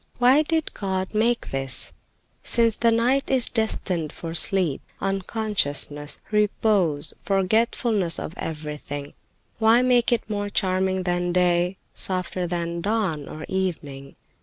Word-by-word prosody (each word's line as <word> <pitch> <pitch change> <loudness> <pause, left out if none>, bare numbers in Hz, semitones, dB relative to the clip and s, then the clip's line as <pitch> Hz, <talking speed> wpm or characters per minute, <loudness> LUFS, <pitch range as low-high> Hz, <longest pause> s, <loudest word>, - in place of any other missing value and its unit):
"Why 255 +4 +5
did 320 0 -1
God 190 -1 -3
make 230 +2 0
this? 135 -1 +5 0.5
Since 230 -2 +3
the 230 -1 +3
night 245 +4 +1
is 260 -3 +3
destined 185 -8 -1
for 165 -1 -7
sleep, 170 -2 +2 0.2
unconsciousness, 195 -7 -2
repose, 205 -7 +1
forgetfulness 200 -1 +1
of - - -5
everything, 150 -2 -6 0.5
why 225 +2 +5
make 245 -2 +3
it 235 -3 0
more 205 -1 -3
charming 190 -1 0
than 175 0 -1
day, 180 +1 +2 0.2
softer 185 -1 -3
than 170 0 -3
dawn 195 -8 -1
or 155 0 -7
evening? 155 -8 -4
190 Hz, 120 wpm, -24 LUFS, 165-220 Hz, 0.5 s, Why